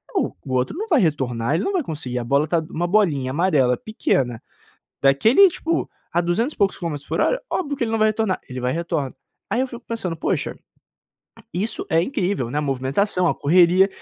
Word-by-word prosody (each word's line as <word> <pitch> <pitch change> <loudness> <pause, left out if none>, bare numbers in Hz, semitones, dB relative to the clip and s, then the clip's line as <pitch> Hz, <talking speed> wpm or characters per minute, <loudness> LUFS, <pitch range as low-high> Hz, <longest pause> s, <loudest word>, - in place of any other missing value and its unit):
o - - +1
o 130 - -4
outro 130 - 0
não 435 +4 -3
vai 315 - +4
retornar, 130 - 0
ele 170 - 0
não 400 - -1
vai 365 -4 +1
conseguir 145 - -4
a - - -3
bola 140 +5 +2
tá 170 +1 +2
uma 175 +2 -2
bolinha 160 -10 +2
amarela 145 -6 +2
pequena, 135 - -1 0.6
daquele 220 - +6
tipo, 335 -1 -2 0.2
a 175 - +2
duzentos 195 - 0
e - - -25
poucos 200 -2 +1
quilômetros 150 -5 -5
por - - -1
hora, - - +2
óbvio 290 -10 -2
que 240 - 0
ele 225 - -3
não 225 - +1
vai 215 - +5
retornar, 215 -3 0
ele 130 0 -5
vai 125 +1 0
e - - -3
retorna. 160 -5 -2 0.4
Aí 245 - +2
eu 260 - +1
fico 245 -1 -10
pensando: 210 -7 -3
"Poxa, - - -2 1.0
isso 200 +7 -3
é 165 +1 +3
incrível," 185 - -1
né, 145 - -1
a - - +1
movimentação, 145 +7 0
a - - +1
correria 180 +5 +4
170 Hz, 210 wpm, -22 LUFS, 140-220 Hz, 1.0 s, daquele